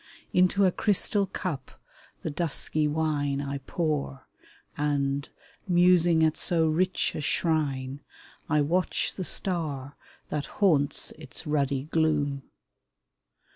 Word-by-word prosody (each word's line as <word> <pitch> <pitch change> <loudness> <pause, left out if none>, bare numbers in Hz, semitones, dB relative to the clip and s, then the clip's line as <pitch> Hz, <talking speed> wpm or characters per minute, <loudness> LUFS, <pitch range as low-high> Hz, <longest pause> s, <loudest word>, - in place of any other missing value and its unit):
Into 185 +2 +4
a 185 - +4
crystal 200 0 +1
cup 160 -7 -5 0.4
the 160 - -2
dusky 155 -1 -1
wine 145 -2 0
I 140 0 -3
pour, 150 -5 -2 0.5
and, 140 -1 0 0.4
musing 175 -2 +5
at 155 -1 +3
so 165 -2 +1
rich 180 +4 +1
a - - -4
shrine, 145 -4 0 0.5
I 150 -1 +3
watch 175 +6 0
the 190 - -4
star 150 -8 -2 0.3
that 150 -1 -2
haunts 155 -9 +2
its 155 +2 -8
ruddy 140 -3 0
gloom. 150 -3 +1
155 Hz, 110 wpm, -27 LUFS, 140-175 Hz, 0.5 s, musing